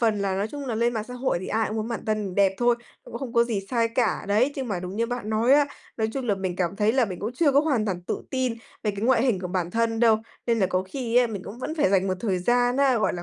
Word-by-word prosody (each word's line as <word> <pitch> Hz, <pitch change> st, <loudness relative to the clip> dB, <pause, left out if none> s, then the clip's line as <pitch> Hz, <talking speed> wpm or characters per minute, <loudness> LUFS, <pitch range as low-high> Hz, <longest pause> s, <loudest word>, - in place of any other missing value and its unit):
phần 220 Hz, -3 st, +2 dB
là 195 Hz, -1 st, -1 dB
nói 205 Hz, +3 st, -1 dB
chung 285 Hz, +1 st, -6 dB
là 235 Hz, -, -2 dB
lên 235 Hz, +2 st, +1 dB
mạng 220 Hz, -2 st, -3 dB
xã 250 Hz, -, -7 dB
hội 250 Hz, -6 st, 0 dB
thì 185 Hz, -, -6 dB
ai 220 Hz, 0 st, 0 dB
cũng 215 Hz, -, -4 dB
muốn 220 Hz, +1 st, -2 dB
bản 235 Hz, -3 st, -4 dB
thân 210 Hz, -4 st, -1 dB
đẹp 195 Hz, -1 st, +4 dB
thôi, 240 Hz, -1 st, +3 dB, 0.3 s
cũng 235 Hz, -, -7 dB
không 250 Hz, -3 st, -6 dB
có 235 Hz, -1 st, +4 dB
gì 225 Hz, -4 st, -2 dB
sai 230 Hz, -2 st, +2 dB
cả 230 Hz, -5 st, 0 dB
đấy, 230 Hz, +8 st, +3 dB
nhưng 265 Hz, -3 st, -3 dB
mà 190 Hz, -4 st, -2 dB
đúng 180 Hz, +3 st, -6 dB
như 230 Hz, -, +1 dB
bạn 245 Hz, -3 st, -4 dB
nói 225 Hz, +4 st, +3 dB
á, 290 Hz, 0 st, +5 dB, 0.3 s
nói 220 Hz, -1 st, 0 dB
chung 265 Hz, -2 st, -3 dB
là 205 Hz, -, +2 dB
mình 185 Hz, -2 st, -3 dB
cảm 185 Hz, 0 st, -1 dB
thấy 210 Hz, +1 st, +2 dB
là 260 Hz, 0 st, +3 dB
mình 185 Hz, -5 st, -6 dB
cũng 215 Hz, +4 st, -3 dB
chưa 285 Hz, +2 st, +2 dB
có 280 Hz, -, +5 dB
hoàn 270 Hz, -9 st, +1 dB
toàn 185 Hz, -4 st, -3 dB
tự -, -, -3 dB
tin 260 Hz, -3 st, 0 dB, 0.3 s
về 215 Hz, -, +1 dB
cái 200 Hz, -1 st, -7 dB
ngoại 245 Hz, -1 st, +4 dB
hình 235 Hz, -8 st, +1 dB
của 180 Hz, -, -4 dB
bản 180 Hz, -2 st, -2 dB
thân 225 Hz, +1 st, 0 dB
đâu. 225 Hz, -2 st, +5 dB, 0.3 s
Nên 230 Hz, -1 st, +2 dB
là 190 Hz, -, +3 dB
có 185 Hz, 0 st, 0 dB
khi 235 Hz, +4 st, -3 dB
á 250 Hz, 0 st, +6 dB
mình 205 Hz, -5 st, -5 dB
cũng 220 Hz, +5 st, -8 dB
vẫn 310 Hz, +5 st, -4 dB
phải 285 Hz, -, +2 dB
dành 195 Hz, -1 st, +3 dB
một 185 Hz, -, 0 dB
thời 195 Hz, -5 st, 0 dB
gian 245 Hz, +6 st, +2 dB
á, 270 Hz, -3 st, +4 dB
gọi 215 Hz, -, +1 dB
là, 175 Hz, -, -5 dB
225 Hz, 320 wpm, -25 LUFS, 200-245 Hz, 0.3 s, á